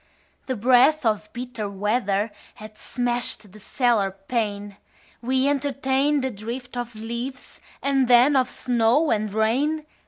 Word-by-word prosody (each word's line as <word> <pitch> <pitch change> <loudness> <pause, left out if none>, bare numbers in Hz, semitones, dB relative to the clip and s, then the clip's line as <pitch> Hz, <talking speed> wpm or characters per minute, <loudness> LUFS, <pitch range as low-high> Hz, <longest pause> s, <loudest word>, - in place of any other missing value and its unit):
The 260 - -1
breath 255 +6 +4
of 215 -1 0
bitter 240 -4 -5
weather 205 +1 -1 0.2
Had 215 0 -11
smashed 240 -4 -2
the 215 - -14
cellar 230 -2 +1
pane: 205 0 -4 0.4
We 260 +2 +1
entertained 280 0 +1
a 260 - -1
drift 235 +4 -7
of 240 -1 -5
leaves 235 +4 -6 0.2
And 275 -2 +2
then 250 +4 +6
of 255 -2 +2
snow 245 +6 +2
and 215 -1 0
rain. 265 +9 0
240 Hz, 130 wpm, -24 LUFS, 215-265 Hz, 0.4 s, then